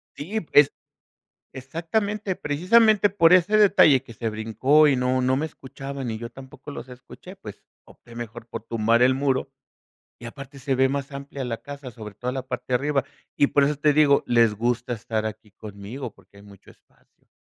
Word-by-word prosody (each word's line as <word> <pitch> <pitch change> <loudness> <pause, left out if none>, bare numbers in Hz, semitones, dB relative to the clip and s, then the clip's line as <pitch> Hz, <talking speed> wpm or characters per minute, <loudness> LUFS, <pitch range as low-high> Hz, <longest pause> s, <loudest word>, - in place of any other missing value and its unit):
Sí, 205 +9 -4
pues, 145 -3 +4 0.8
exactamente, 185 - -3
precisamente 205 +8 +3
por 180 -3 +4
ese 185 +4 +4
detalle 155 -10 +5
que 115 - -12
se 115 +1 -3
brincó 115 +8 +3
y 140 - +3
no 125 0 0
no 130 +1 +1
me 155 - -1
escuchaban 135 -3 -7
y 110 - -4
yo 115 +1 -7
tampoco 135 +2 -12
los 130 -2 -9
escuché, 125 0 -13
pues, - - -11 0.2
opté 115 - -17
mejor 120 0 -8
por 115 -2 -7
tumbar 115 +1 +1
el 130 +1 +5
muro, 135 -1 -1 0.7
y 120 - -8
aparte 135 +3 -10
se 135 0 -1
ve 130 +1 +3
más 140 0 -3
amplia 140 0 -6
la 115 -2 -4
casa, 140 -2 -9
sobre 110 -3 -10
toda 125 +4 -4
la 130 0 -4
parte - - -5
de 125 - 0
arriba. 140 +1 0 0.3
Y 145 - +3
por 145 - +3
eso 150 +2 +1
te 150 +1 +3
digo, 145 -1 +4
les 115 -3 +3
gusta 120 +3 -1
estar 110 -1 -3
aquí 110 0 -8
conmigo 105 +4 -9
porque 100 +1 -23
hay - - -15
mucho 100 -1 -17
espacio, - - -28
130 Hz, 190 wpm, -24 LUFS, 115-145 Hz, 0.8 s, detalle